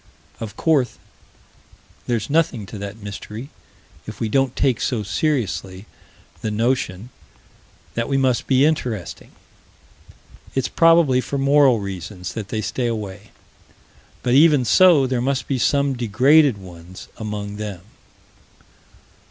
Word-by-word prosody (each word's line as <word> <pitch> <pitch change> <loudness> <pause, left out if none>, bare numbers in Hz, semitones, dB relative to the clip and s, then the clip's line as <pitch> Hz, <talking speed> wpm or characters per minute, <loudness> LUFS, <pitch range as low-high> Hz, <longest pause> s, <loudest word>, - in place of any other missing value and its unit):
Of 110 -3 -7
course 145 -6 +1 1.1
there's 115 -3 -1
nothing 145 -8 0
to 105 +2 -9
that 100 +1 -6
mystery 105 +5 -8 0.6
if 110 -1 -8
we 115 - -2
don't 135 +2 +1
take 130 -5 +1
so 120 -6 -1
seriously 105 - -2 0.6
the 110 - -2
notion 115 -1 -1 0.8
that 115 +2 -2
we 135 - +1
must 130 -3 +1
be 135 +1 +4
interesting. 125 - -2 1.3
It's 135 - 0
probably 165 -6 +4
for 140 - -4
moral 140 -3 +4
reasons 95 -1 -6
that 105 -3 -5
they 110 +1 -3
stay 120 +2 -2
away 105 -3 -5 0.9
but 125 - +1
even 145 -2 +5
so, 155 - +5
there 130 -2 -1
must 135 +1 -1
be 135 -2 -1
some 140 +2 +2
degraded 130 +3 +3
ones 90 -1 -12
among 105 -1 -5
them. 105 -4 -6
120 Hz, 125 wpm, -21 LUFS, 105-135 Hz, 1.3 s, even